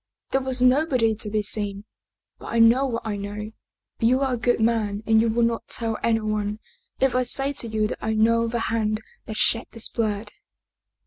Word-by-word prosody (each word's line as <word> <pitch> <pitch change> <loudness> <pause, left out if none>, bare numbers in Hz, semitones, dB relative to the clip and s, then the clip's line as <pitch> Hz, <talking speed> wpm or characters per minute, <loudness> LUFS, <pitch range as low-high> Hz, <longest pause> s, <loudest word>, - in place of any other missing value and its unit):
There 270 - +2
was 260 -1 0
nobody 255 -4 +3
to 215 0 -5
be 210 0 0
seen. 205 -1 -1 0.6
But - - -10
I 235 - -2
know 235 +4 +5
what 230 -3 -3
I 210 -2 -2
know. 205 +2 -6 0.5
You 250 +4 +3
are 265 -2 +1
a - - -1
good 240 +1 +1
man 220 -2 0
and 220 0 +4
you 230 - +2
will 235 +2 +1
not 230 0 -1
tell 225 -1 -2
anyone 215 -2 0 0.4
if 265 -2 +2
I 255 - +2
say 270 +3 0
to 240 - -2
you 215 -1 0
that - - -6
I 220 - -1
know 230 +1 +3
the 235 0 -2
hand 220 -1 -1 0.2
that 215 - -5
shed 230 +1 +1
this 230 -2 -2
blood." 210 -2 -2
225 Hz, 200 wpm, -24 LUFS, 215-240 Hz, 0.6 s, know